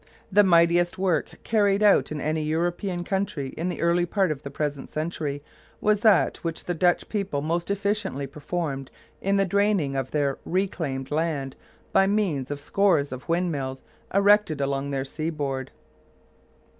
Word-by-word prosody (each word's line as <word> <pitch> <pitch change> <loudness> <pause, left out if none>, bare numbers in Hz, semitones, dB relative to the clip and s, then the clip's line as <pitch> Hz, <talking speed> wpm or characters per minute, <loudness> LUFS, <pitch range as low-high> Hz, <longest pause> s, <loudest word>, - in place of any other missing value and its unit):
The 205 +2 +6
mightiest 175 -1 +4
work 185 -5 0
carried 205 -2 +2
out 205 -6 +4
in 155 - -3
any 155 +2 -1
European 175 +4 -1
country 190 -7 -2
in 170 +6 -3
the - - -4
early 175 +1 +2
part 190 -1 +1
of 145 -2 -4
the 140 - -7
present 145 -1 -3
century 155 -3 -3 0.4
was 210 -1 +2
that 215 -4 +4
which 165 -1 -5
the 175 - -1
Dutch 175 +1 +2
people 195 -9 -2
most 170 +3 -1
efficiently 200 -8 -1
performed 140 -1 -4 0.3
in 195 +1 +1
the 195 - +3
draining 200 -7 +1
of 135 -1 -2
their 140 -2 0
reclaimed 160 -8 -2
land 150 -4 -1 0.4
by 195 - +5
means 190 -11 0
of 145 0 -4
scores 155 -3 +2
of 130 +3 -8
windmills 150 -7 -1 0.3
erected 200 -5 +4
along 140 0 -1
their 135 -1 -2
seaboard. 145 -3 -3
165 Hz, 155 wpm, -25 LUFS, 140-195 Hz, 0.4 s, The